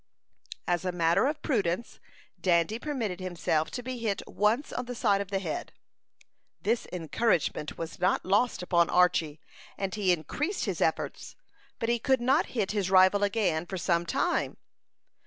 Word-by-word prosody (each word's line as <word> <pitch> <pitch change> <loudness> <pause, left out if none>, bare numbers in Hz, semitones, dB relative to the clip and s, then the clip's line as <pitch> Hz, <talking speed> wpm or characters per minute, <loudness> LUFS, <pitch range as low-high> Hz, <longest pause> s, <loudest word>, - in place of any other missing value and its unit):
As 175 -1 +1
a 185 - -1
matter 170 +6 +2
of 300 +1 -3
prudence, 205 - -1 0.4
Dandy 180 +5 +2
permitted 240 - -3
himself 170 -4 -1
to 245 - -6
be 255 0 -5
hit 215 -4 -2
once 220 +7 0
on 250 - -3
the 245 0 -6
side 205 -4 +2
of 200 - -6
the 200 - 0
head. 180 -5 -4 0.9
This 230 +4 0
encouragement 175 -2 -1
was 165 0 -6
not 185 +1 +1
lost 205 +2 +1
upon 170 -1 +3
Archy, 180 -4 +2 0.4
and 195 -1 -3
he 200 -4 +2
increased 290 - -1
his - - -3
efforts, - - -1 0.4
but 230 - -2
he 235 0 +1
could 265 +2 +2
not 265 +7 +2
hit 200 -4 +1
his 200 -3 -1
rival 190 +1 +5
again 190 -6 0
for 190 - -4
some 170 0 0
time. - - 0
195 Hz, 160 wpm, -28 LUFS, 175-230 Hz, 0.9 s, rival